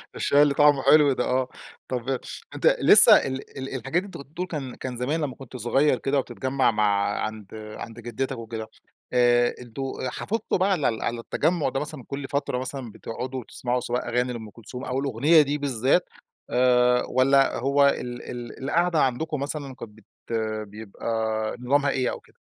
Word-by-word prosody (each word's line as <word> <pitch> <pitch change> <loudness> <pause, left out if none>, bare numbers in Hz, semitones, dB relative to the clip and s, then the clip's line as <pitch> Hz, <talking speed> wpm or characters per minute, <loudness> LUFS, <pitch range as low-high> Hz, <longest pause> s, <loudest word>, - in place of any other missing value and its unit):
الشاي 145 +1 +3
اللي 145 -1 +4
طعمه 145 -1 +4
حلو 145 +1 +6
ده 125 - -1
آه، 130 0 0 0.4
طب 125 0 -4 0.5
أنت - - +3
لسّه - - +10
ال 135 0 -2 0.4
الحاجات 130 +6 -6
اللي - - -10
أنت 195 - -9
كنت 140 - -11
بتقول 155 -5 -5
كان 125 -2 -6
زمان 145 +7 -1
لمّا 140 -4 -3
كنت 130 -1 -10
صغيّر 130 +4 +2
كده 140 +2 0
وبتتجمَّع 130 -1 0
مع 100 -1 +1
عند 110 -2 -6 0.3
عند 115 +2 -9
جدتك 120 +3 -4
وكده 110 -1 -6 0.5
آآ، 120 0 +3
أنتم 120 +2 -8 0.2
آآ - - -1
حافظتم 220 - -2
بقى 190 +2 +1
على 165 -9 +2
ال 110 -1 -4
على 120 0 -2
التجمُّع 160 +6 0
ده 135 - -2
مثلًا 150 -2 -6
كل 140 -1 -5
فترة 140 -3 -2
مثلًا 130 -2 -5
بتقعدوا 125 +4 -6
تسمعوا 125 0 -2
سواء 120 0 -3
أغاني 125 +1 0
لأم 110 -3 -8
كلثوم 120 +4 -9
أو 130 +1 -2
الأغنية 140 +5 +4
دي 145 0 -1
بالذات، 140 +3 +1 0.4
آآ، 125 0 +3
والَّا 135 +1 +3
هو 140 +2 +3
ال 125 -3 -2
ال 120 +1 -8
القعدة 170 +3 +1
عندكم 145 +4 -1
مثلًا 140 -1 -5
كانت 110 -3 -10
بت 110 -1 -21 0.6
بيبقى 105 0 -10 0.5
نظامها 140 +3 +1
إيه 130 -2 0
أو - - -6
كده؟ - - -26
130 Hz, 175 wpm, -25 LUFS, 120-140 Hz, 0.6 s, لسّه